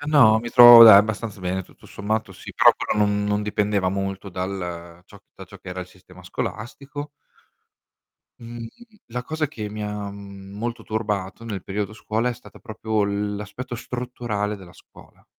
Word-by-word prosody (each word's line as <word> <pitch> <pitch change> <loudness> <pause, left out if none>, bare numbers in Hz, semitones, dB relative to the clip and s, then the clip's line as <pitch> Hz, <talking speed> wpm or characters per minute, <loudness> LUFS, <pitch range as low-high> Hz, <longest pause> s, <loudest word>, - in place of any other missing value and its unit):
Ma 145 - -8
no, 110 -5 +7
mi 120 +1 -6
trovo 120 -1 +10
dai, 105 -3 +10
abbastanza 105 -1 -2
bene, 95 +1 -2
tutto - - -20
sommato 110 +2 -3
sì, - - -11
però - - +6
quello 105 - 0
non 105 0 -1
non 105 0 0
dipendeva 105 -2 0
molto 95 +1 -4
dal 90 -2 -6
ciò 100 - -16 0.2
da - - -11
ciò - - -13
che 95 - -10
era 90 0 -5
il 90 - -7
sistema 90 0 -18
scolastico. 140 +10 -6 1.3
Mhmm, 115 0 -8 0.4
la 125 +1 -5
cosa 155 +3 -2
che 110 -7 -7
mi 105 0 -6
ha, 105 -1 -5
mhmm, 100 0 -11
molto 120 +1 -4
turbato 105 -2 -4
nel 100 -5 -6
periodo 105 +1 -4
scuola, 110 +2 -2
è 125 - -2
stata 125 - -16
proprio 110 -1 -3
l'aspetto 105 +4 -4
strutturale 120 -4 -4
della 90 -3 -14
scuola. - - -20
105 Hz, 170 wpm, -23 LUFS, 100-115 Hz, 1.3 s, trovo